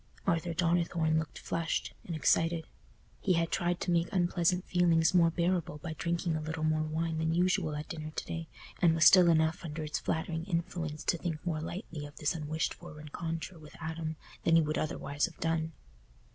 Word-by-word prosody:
Arthur 170 -2 0
Donnithorne 170 -2 +2
looked 160 - -5
flushed 165 0 -2
and 170 - -4
excited; 165 +1 +2 0.5
he 190 - +2
had 165 -1 +1
tried 175 -1 0
to 180 - 0
make 170 0 +2
unpleasant 180 0 +2
feelings 170 -2 +3
more 170 -2 +6
bearable 170 -1 0
by 160 +2 -5
drinking 170 +1 -1
a 155 - -2
little 155 0 -4
more 155 0 +2
wine 160 +1 -1
than 160 +1 +1
usual 175 -3 +2
at 150 +1 -5
dinner 155 -1 -5
to 155 - -5
day, 165 0 -5 0.3
and 165 -3 +5
was 160 -1 +4
still 180 -3 +8
enough 160 +1 +2
under 155 -1 -4
its 150 - -2
flattering 160 0 -2
influence 165 -4 -3
to 170 - +1
think 160 -3 -4
more 160 -3 -1
lightly 165 -3 -5
of 145 - -16
this 150 - 0
unwished 155 0 -2
for 175 -3 -11
rencontre 165 +3 -5
with 150 -1 -13
Adam 160 0 -4 0.3
than 165 - +4
he 165 - +7
would 155 +1 -1
otherwise 145 -1 -1
have 170 - -14
done. 165 0 0
165 Hz, 190 wpm, -31 LUFS, 155-170 Hz, 0.5 s, still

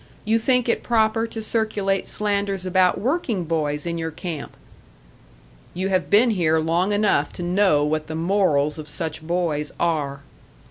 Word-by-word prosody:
You 220 +2 +2
think 250 +1 +2
it 235 - +1
proper 225 -1 +1
to 225 -1 -6
circulate 210 -3 0
slanders 200 -2 -1
about 185 0 +2
working 245 - -1
boys 150 -2 -2
in 170 -1 -3
your 160 0 -2
camp?" 160 -2 -7 1.2
"You 185 +2 -1
have 185 -1 0
been 225 +4 +5
here 165 -6 +2
long 170 +5 +1
enough 205 0 +2
to 175 - -6
know 175 -5 +3
what 155 0 -1
the 160 - -5
morals 160 -4 +1
of 150 - -7
such 160 0 -4
boys 160 -3 -1
are." 145 -5 -1
180 Hz, 155 wpm, -22 LUFS, 160-210 Hz, 1.2 s, been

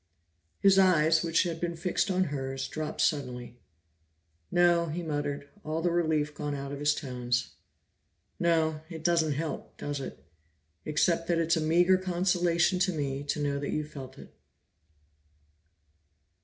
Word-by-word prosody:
His 195 -1 +5
eyes, 165 -4 +4
which 165 -1 +2
had 165 -2 -4
been 170 -1 -2
fixed 175 +4 -1
on 185 0 +2
hers, 135 -1 -3
dropped 155 -1 -4
suddenly. 125 -5 -1 0.9
"No," 175 -1 +3
he 170 +3 -4
muttered, 145 -2 -3 0.2
all 155 +2 -3
the 175 - +2
relief 155 -3 +1
gone 145 -1 -3
out 140 0 -5
of 140 - -5
his 145 0 +2
tones, 125 -2 -2 0.9
"no, 160 -2 +1
it 160 -3 -8
doesn't 165 -3 +2
help, 155 +3 -5
does 145 -1 -4
it? 135 - -8 0.6
Except 165 +2 +1
that 170 - +2
it's 165 0 +2
a 160 - 0
meager 175 +4 +4
consolation 175 -1 +1
to 185 +1 +2
me 140 -4 -3
to 145 - -2
know 140 -1 -1
that 140 - -4
you 150 - -1
felt 135 -3 -10
it." - - -13
160 Hz, 150 wpm, -29 LUFS, 145-175 Hz, 0.9 s, His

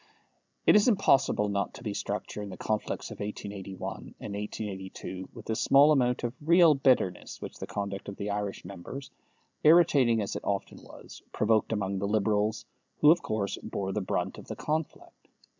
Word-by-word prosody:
It - - +7
was 210 +2 +5
impossible 190 - +3
not 100 -1 -2
to - - -11
be 105 -4 -3
struck 100 +1 -3
during 105 -1 -6
the - - -8
conflicts 110 -1 -3
of - - -9
1881 100 -2 -6
and 100 - -6
1882 95 -2 -6
with 115 -3 -11
the 110 - -1
small 140 +6 +5
amount 125 -4 +2
of 120 0 -2
real 170 +1 +6
bitterness 130 -10 +1
which - - -8
the - - -5
conduct 100 -1 -4
of 100 - -7
the 100 +1 -4
Irish 100 -1 -3
members, 130 +9 -8 0.5
irritating 145 -8 +5
as 100 - -3
it - - -5
often 100 -1 -3
was, - - -13
provoked 110 0 +2
among 100 -3 -1
the 100 - -1
Liberals, 105 0 +1 0.4
who 150 - +8
of 170 - +3
course 100 -2 -2
bore 95 -1 -3
the 105 - -1
brunt 95 - -2
of - - -13
the - - -5
conflict. 155 0 -4
105 Hz, 175 wpm, -29 LUFS, 100-130 Hz, 0.5 s, who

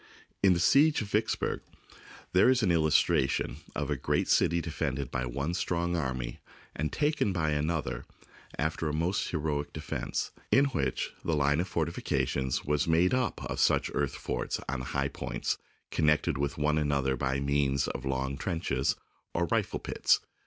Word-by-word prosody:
In 95 -2 +6
the 85 - 0
siege 145 - +5
of 100 - -8
Vicksburg 110 +2 0 0.7
there 95 +7 +6
is 130 -3 +3
an 95 - +3
illustration 80 -4 +2 0.2
of 75 0 -2
a - - +2
great - - 0
city 85 - +3
defended 70 -5 -3
by 65 0 -1
one 70 +7 -2
strong 85 -1 0
army 65 -6 -3 0.4
and 75 0 -2
taken 150 -8 +1
by 80 -4 0
another 75 +2 -1 0.5
after 80 +1 -1
a - - -3
most 85 +5 0
heroic 75 -3 -2
defence, - - -3 0.2
in 140 - +6
which 70 - -1
the 80 - +1
line 75 +1 +2
of 90 - 0
fortifications 80 -5 -1
was 75 0 +1
made 85 +3 +4
up 130 -4 0
of - - -4
such - - +3
earth - - 0
forts - - -3
on 65 -1 -2
high 70 +2 -1
points - - -3 0.3
connected 75 -2 +2
with 70 0 -2
one 75 +1 +2
an 75 -1 0
other 65 -1 +1
by 65 +1 -1
means 70 -1 +1
of - - -4
long 65 0 -1
trenches, 75 -5 0 0.4
or 85 - +2
rifle - - +1
pits. - - +2
75 Hz, 165 wpm, -30 LUFS, 70-85 Hz, 0.7 s, In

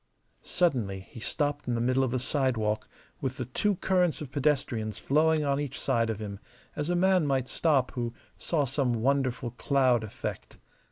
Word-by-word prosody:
Suddenly 115 - 0
he 105 - -12
stopped 145 +4 -2
in 120 - 0
the - - 0
middle 130 +3 +2
of 130 - +1
the 130 - 0
sidewalk 120 -5 0 0.3
with 130 -1 -2
the 125 - -3
two 200 - 0
currents 180 -3 +1
of 145 -5 -7
pedestrians 130 -7 0
flowing 155 +2 +2
on 140 0 +1
each 145 -3 -4
side 115 -1 +1
of 110 - -1
him, 100 -2 -6 0.4
as 150 +1 -2
a 175 - +2
man 185 -3 +3
might 135 -2 +1
stop 140 -5 +2
who 120 -2 -3 0.2
saw 155 -4 0
some 135 -1 0
wonderful 125 0 0
cloud 125 -1 +2
effect. 110 - -6
130 Hz, 175 wpm, -28 LUFS, 120-150 Hz, 0.4 s, man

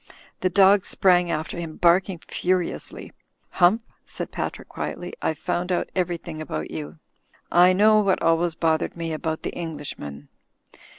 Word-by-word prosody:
The 185 - +1
dog 195 +1 +5
sprang 180 -2 +3
after 160 +2 -3
him, 165 -2 -6
barking 180 +2 +3
furiously. 180 +1 -3 0.4
"Hump," 190 +6 +4 0.2
said - - -6
Patrick, - - -4
quietly. 180 0 -5
"I've 160 - -1
found 175 +3 -2
out 175 - -1
everything 175 -3 -2
about 80 - -5
you. 75 0 -6 0.5
I 180 +1 +6
know 215 +3 +5
what 195 -2 +2
always 165 0 +2
bothered 160 0 0
me 165 -1 -3
about 160 0 -3
the - - -2
Englishman." 145 - -7
175 Hz, 140 wpm, -24 LUFS, 160-185 Hz, 0.5 s, I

